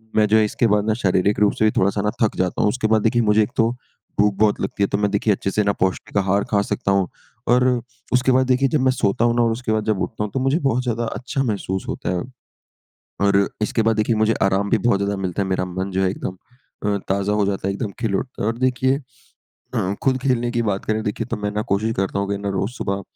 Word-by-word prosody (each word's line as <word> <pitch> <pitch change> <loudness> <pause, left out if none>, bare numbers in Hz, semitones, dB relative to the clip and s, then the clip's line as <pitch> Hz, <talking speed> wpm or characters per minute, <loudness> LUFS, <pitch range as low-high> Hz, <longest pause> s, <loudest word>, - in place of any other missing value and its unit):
मैं 110 - +5
जो 110 - +5
इसके 115 +2 +1
बाद 105 0 +2
ना 110 - +3
शारीरिक 95 +2 +2
रूप 105 -1 +4
से 110 - +4
भी 110 - +4
थोड़ा-सा 100 +2 +2
ना 105 - 0
थक 110 - +2
जाता 90 -1 0
हूँ। - - +3
उसके 110 +1 -1
बाद, 110 0 +3
देखिए, 120 +2 +2
मुझे 110 0 +4
एक 105 - -5
तो 115 0 +4 0.5
भूख 105 0 +4
बहुत 105 -1 +3
लगती 95 +1 -1
है, - - +3
तो 100 - -1
मैं 105 0 0
देखिए 105 +1 +2
अच्छे 95 0 -2
से 105 +2 +1
ना 100 0 +1
पौष्टिक 95 +2 -2
आहार 100 +1 +2
खा 100 -2 +3
सकता 100 -1 0
हूँ 95 -2 +2 0.4
और 125 +2 +4 0.5
उसके 125 +1 +3
बाद, 130 0 +3
देखिए, 130 +1 +3
जब 145 0 +1
मैं 130 0 +4
सोता 115 -2 +1
हूँ 120 0 +2
ना 120 - +3
और 115 - +2
उसके 115 0 -3
बाद 110 -1 0
जब 100 - -1
उठता 105 - -3
हूँ, 105 - -4
तो 135 - 0
मुझे 135 +6 +1
बहुत 125 -4 +1
ज़्यादा 120 -1 -1
अच्छा 130 +4 -3
महसूस 100 -5 -2
होता - - -3
है - - -2 1.1
और 100 0 +3
इसके 110 +1 +1
बाद 115 0 +2
देखिए, 110 +1 +1
मुझे 110 +1 +2
आराम 95 +1 +1
भी 115 - +3
बहुत 105 -2 +2
ज़्यादा 100 0 -1
मिलता 95 +1 -1
है। 95 - -3
मेरा 95 -1 0
मन 95 +2 -4
जो 95 0 0
है 95 - +2
एकदम 95 -1 -5 0.5
अ, - - +1 0.2
ताज़ा 100 +1 0
हो 105 -1 +2
जाता 95 -1 -2
है, - - 0
एकदम 105 +1 -3
खिल 110 -4 -1
उठता 125 - -5
है - - 0
और 115 - -2
देखिए 130 +1 +2 0.8
अ, 95 +2 0
खुद 130 -1 +2
खेलने 125 -3 +1
की 120 -1 0
बात 100 -2 -2
करें, 110 0 0
देखिए, 105 +2 -2
तो - - -3
मैं 105 0 -3
ना 105 +1 -1
कोशिश 110 +3 +1
करता 95 +1 -1
हूँ 100 0 -2
कि 100 - -1
ना 100 0 -3
रोज़ 100 +3 -1
सुबह 100 -5 -3
105 Hz, 265 wpm, -21 LUFS, 100-120 Hz, 1.1 s, मैं